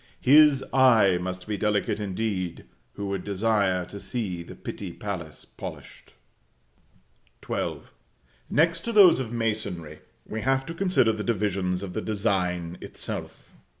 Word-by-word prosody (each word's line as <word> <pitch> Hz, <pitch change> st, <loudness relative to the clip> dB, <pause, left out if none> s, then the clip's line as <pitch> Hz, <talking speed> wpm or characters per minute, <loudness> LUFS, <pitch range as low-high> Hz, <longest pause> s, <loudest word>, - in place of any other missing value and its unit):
His 145 Hz, 0 st, +6 dB
eye 115 Hz, -9 st, +5 dB
must 90 Hz, 0 st, -5 dB
be 105 Hz, -1 st, -3 dB
delicate 105 Hz, 0 st, 0 dB
indeed, 95 Hz, -3 st, -3 dB, 0.3 s
who 100 Hz, -, -5 dB
would 100 Hz, -2 st, -3 dB
desire 100 Hz, -3 st, +1 dB
to 100 Hz, -, -9 dB
see 100 Hz, -7 st, -3 dB
the 85 Hz, -, -10 dB
Pitti 95 Hz, -4 st, -6 dB
palace 85 Hz, -8 st, -6 dB
polished. -, -, -10 dB, 1.3 s
XII. -, -, -2 dB, 0.7 s
Next 165 Hz, +2 st, +3 dB
to 235 Hz, -, -4 dB
those 200 Hz, -8 st, +7 dB
of 130 Hz, -4 st, -3 dB
the 120 Hz, -, -6 dB
masonry, 100 Hz, -9 st, -3 dB, 0.3 s
we 110 Hz, -, -5 dB
have 135 Hz, +1 st, +1 dB
to 165 Hz, -, -6 dB
consider 180 Hz, -10 st, +2 dB
the 110 Hz, -1 st, -4 dB
divisions 95 Hz, -4 st, -1 dB
of 95 Hz, -2 st, -6 dB
the -, -, -2 dB
design 90 Hz, -5 st, -1 dB
itself. -, -, -7 dB
105 Hz, 140 wpm, -26 LUFS, 90-120 Hz, 1.3 s, those